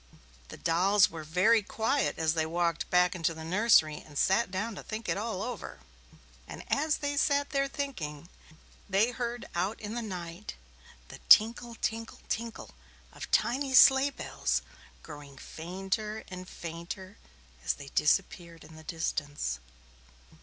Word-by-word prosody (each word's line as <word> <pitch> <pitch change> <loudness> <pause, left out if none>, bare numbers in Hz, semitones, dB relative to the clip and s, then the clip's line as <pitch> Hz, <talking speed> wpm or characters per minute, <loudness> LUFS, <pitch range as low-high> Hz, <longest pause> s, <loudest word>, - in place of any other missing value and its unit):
The - - -10
dolls 190 +5 +3
were 160 -1 -7
very 185 +9 +3
quiet 225 +7 0
as 160 -1 +1
they 160 -1 0
walked 170 0 -1
back 180 0 +4
into 165 -2 -1
the 160 - -8
nursery 170 -3 +4
and 145 -2 -11
sat 195 +8 +3
down 210 +5 -3
to - - -8
think 220 +1 -6
it - - +1
all 210 -2 -3
over, 245 +1 -6 0.7
and - - -8
as 305 +2 +1
they 285 0 -2
sat 285 -1 +1
there 275 -1 +1
thinking, 170 - -5 0.6
they 200 +5 +3
heard 240 -1 -4
out 185 +5 -1
in 210 0 -6
the 240 - -2
night 180 -2 -6 0.5
the - - -10
"tinkle, 235 +2 +6
tinkle, 225 0 -3
tinkle" 230 0 -4 0.4
of - - -8
tiny 265 +2 +1
sleigh 265 +2 +8
bells, 280 - -2 0.4
growing 145 -3 -11
fainter 195 +8 -4
and 185 0 -8
fainter 170 +4 -8 0.4
as - - +1
they 140 -1 -10
disappeared 170 +1 0
in 155 +1 -14
the 160 - -12
distance. 145 - -3
190 Hz, 145 wpm, -30 LUFS, 165-230 Hz, 0.7 s, sleigh